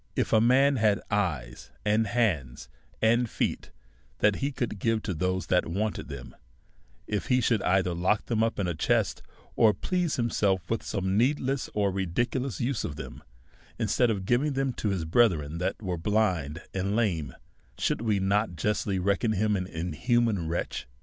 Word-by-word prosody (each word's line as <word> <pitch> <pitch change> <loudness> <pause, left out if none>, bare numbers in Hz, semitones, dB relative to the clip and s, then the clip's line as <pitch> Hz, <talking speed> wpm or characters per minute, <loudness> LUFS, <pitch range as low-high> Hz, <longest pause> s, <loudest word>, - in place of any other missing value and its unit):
If - - 0
a 110 - +6
man 135 +4 +4
had 105 -2 +3
eyes, 85 - -2 0.2
and 105 +1 +2
hands, 90 - -1 0.4
and 120 +1 +3
feet, - - -2 0.5
which 105 -1 +3
he 140 +1 -1
could 120 -6 -3
give 115 0 0
to 95 - -2
those 90 +3 -1
that 90 - +2
wanted 105 +5 -2
them; 65 -4 -9 0.7
if 105 -1 -3
he 125 -1 +3
should 115 -3 +2
either 90 -1 +2
lock 90 +5 +1
them 115 -2 0
up 115 0 0
in 100 - 0
a 90 - -1
chest, 75 - 0 0.3
or 110 -3 +5
please 180 - -1
himself 100 -7 0
with 115 - 0
some 95 -2 -1
needless 135 +1 0
or 100 -2 +2
ridiculous 110 +6 -1
use 120 0 -1
of 70 - -4
them, 65 -2 -8 0.6
instead 125 - +2
of 100 -4 -2
giving 135 +7 +2
them 135 -1 0
to 110 - -2
his 95 -5 -1
brethren 80 -5 +2
that 95 +2 -2
were 90 -3 -2
blind 90 -5 0
and 95 +2 -1
lame, 85 - 0 0.4
should - - 0
we 110 -4 +1
not 100 0 +1
justly 100 +3 -1
reckon 100 +4 +1
him 105 +1 +1
an 90 -2 -2
inhuman 90 - 0
wretch? 85 -5 -3
105 Hz, 170 wpm, -28 LUFS, 90-115 Hz, 0.7 s, a